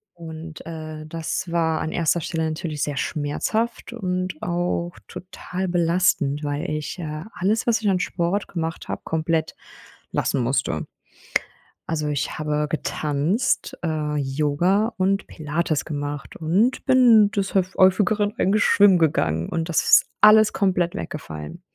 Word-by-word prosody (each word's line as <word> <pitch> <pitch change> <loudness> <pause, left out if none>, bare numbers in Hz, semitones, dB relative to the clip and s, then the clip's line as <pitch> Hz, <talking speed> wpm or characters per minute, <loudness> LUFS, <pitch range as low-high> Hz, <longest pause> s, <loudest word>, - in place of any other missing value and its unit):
Und, 160 -1 -9
äh, 155 -1 -7
das 165 +2 -4
war 160 -2 +1
an 160 - -3
erster 170 0 +1
Stelle 160 +1 -2
natürlich 155 -1 -3
sehr 145 -1 -3
schmerzhaft 215 +14 -2
und 185 -6 -3
auch 175 0 -1 0.2
total 185 0 -6
belastend, 170 -4 +1
weil 145 0 -2
ich, 155 +4 -4
äh, 155 -1 -5
alles, 205 +5 0
was 225 -1 +2
ich 210 - +1
an 185 -2 +2
Sport 185 +2 -1
gemacht 165 -2 -4
habe, - - -3
komplett 160 0 -1 0.6
lassen 135 - 0
musste. 120 - -1 1.0
Also, 155 -2 -1
ich 145 -1 -2
habe 150 0 -1
getanzt, 155 - -1
äh, 155 -3 -1
Yoga 150 - +1
und 195 +1 +1
Pilates 155 -1 -2
gemacht 145 -2 -5
und 190 +11 +1
bin 240 -6 +6
des 200 -1 -2
höf 190 -1 +1
häufigeren 205 +2 +3
eigentlich 205 +2 +2
schwimmen 200 -3 +6
gegangen 85 - +1
und 165 0 -2
das 170 - +2
ist - - +6
alles 215 0 +7
komplett 180 -3 +1
weggefallen. 80 - -7
165 Hz, 140 wpm, -23 LUFS, 150-190 Hz, 1.0 s, alles